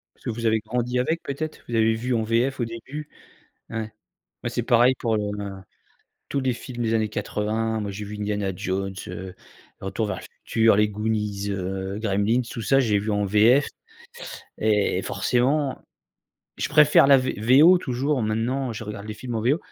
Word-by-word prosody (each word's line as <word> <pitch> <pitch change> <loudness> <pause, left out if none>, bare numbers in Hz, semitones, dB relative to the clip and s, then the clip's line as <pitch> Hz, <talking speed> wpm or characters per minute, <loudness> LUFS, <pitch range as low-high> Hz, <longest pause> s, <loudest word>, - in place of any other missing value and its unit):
Parce - - -26
que - - -2
vous 115 +1 -3
avez 110 0 +3
grandi 120 +3 -2
avec 160 +6 -1
peut-être? 155 +3 -5
Vous 120 - -4
avez 110 0 +3
vu 120 +3 -2
en 115 - +1
VF 120 +5 0
au - - +2
début? 125 +6 -7 0.6
Ouais. 110 -1 -4 0.5
Moi - - -2
c'est 120 0 -2
pareil 120 +1 +5
pour 115 -2 0
le, 105 - -1 0.2
heu, 100 -1 -5 0.8
tous 140 - -1
les 130 -1 +1
films 120 0 -6
des 115 -1 +1
années 110 -1 +1
80. 110 +2 -2
Moi, 105 -1 -3
j'ai 100 +2 -6
vu 105 +1 -7
Indiana 105 -2 -1
Jones, 95 +2 -3
heu, 90 +1 -7 0.5
Retour 95 +3 -2
vers - - -3
le - - -10 0.2
futur, 110 -2 +4
les 105 0 +3
Goonies, 105 -1 -2
heu, 95 +1 -3
Gremlins, 110 +3 +1
tout 115 - -6
ça 135 +6 +4
j'ai 110 -5 +2
vu 105 +2 -2
en 105 0 +1
VF 110 +8 +4 0.9
et 105 -2 +2
et - - -2
forcément, 135 +3 0 0.8
je - - -2
préfère 150 -2 +6
la 140 - +8
V 130 0 -2 0.3
VO. 180 +4 +8
Toujours, 135 -2 -1
maintenant, 115 +4 -1
je 110 0 -6
regarde 105 -1 -7
les 110 - -4
films 120 +2 -6
en - - -1
VO 135 +7 +2
110 Hz, 190 wpm, -24 LUFS, 105-125 Hz, 0.9 s, la